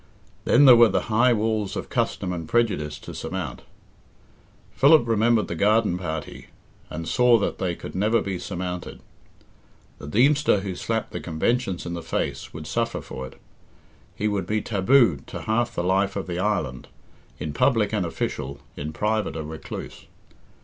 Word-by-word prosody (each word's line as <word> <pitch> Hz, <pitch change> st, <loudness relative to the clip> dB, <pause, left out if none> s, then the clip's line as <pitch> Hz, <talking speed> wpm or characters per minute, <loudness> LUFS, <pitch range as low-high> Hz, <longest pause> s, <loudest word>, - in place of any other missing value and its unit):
Then 140 Hz, +4 st, +5 dB
there 130 Hz, -3 st, +10 dB
were 115 Hz, -1 st, +7 dB
the 100 Hz, -, -1 dB
high 120 Hz, +3 st, +5 dB
walls 110 Hz, -3 st, 0 dB
of -, -, -5 dB
custom 90 Hz, -1 st, -1 dB
and 80 Hz, -3 st, -6 dB
prejudice 90 Hz, -11 st, 0 dB
to -, -, -9 dB
surmount. -, -, -5 dB, 1.1 s
Philip 145 Hz, -2 st, +5 dB
remembered 115 Hz, 0 st, +2 dB
the -, -, -4 dB
garden 105 Hz, +1 st, +2 dB
party, 80 Hz, -4 st, -6 dB, 0.4 s
and 80 Hz, +1 st, -6 dB
saw 125 Hz, -1 st, +4 dB
that 100 Hz, -, -2 dB
they 90 Hz, -2 st, -1 dB
could -, -, -9 dB
never 110 Hz, +4 st, +2 dB
be 95 Hz, -2 st, -3 dB
surmounted. 90 Hz, -1 st, -5 dB, 1.0 s
The -, -, -9 dB
Deemster 135 Hz, -, +3 dB
who 95 Hz, -1 st, -4 dB
slapped -, -, -2 dB
the -, -, -4 dB
conventions 95 Hz, +4 st, -1 dB
in 85 Hz, -, -4 dB
the 85 Hz, -, -4 dB
face 80 Hz, -, -3 dB
would -, -, -8 dB
suffer -, -, -1 dB
for 65 Hz, 0 st, -7 dB
it. -, -, -16 dB, 0.8 s
He 105 Hz, -, -1 dB
would 100 Hz, -4 st, -1 dB
be 110 Hz, +1 st, +1 dB
taboo 110 Hz, -, +3 dB
to -, -, -7 dB
half 120 Hz, +2 st, 0 dB
the 85 Hz, -, -1 dB
life 95 Hz, +2 st, +1 dB
of 100 Hz, -, -3 dB
the 90 Hz, -1 st, -4 dB
island 95 Hz, -11 st, -1 dB, 0.5 s
in 75 Hz, 0 st, -5 dB
public -, -, +2 dB
an -, -, +1 dB
official, 70 Hz, -1 st, -4 dB, 0.2 s
in 75 Hz, +2 st, -5 dB
private 105 Hz, +3 st, -1 dB
a 80 Hz, -, -4 dB
recluse. 80 Hz, +1 st, -8 dB
100 Hz, 165 wpm, -24 LUFS, 85-115 Hz, 1.1 s, there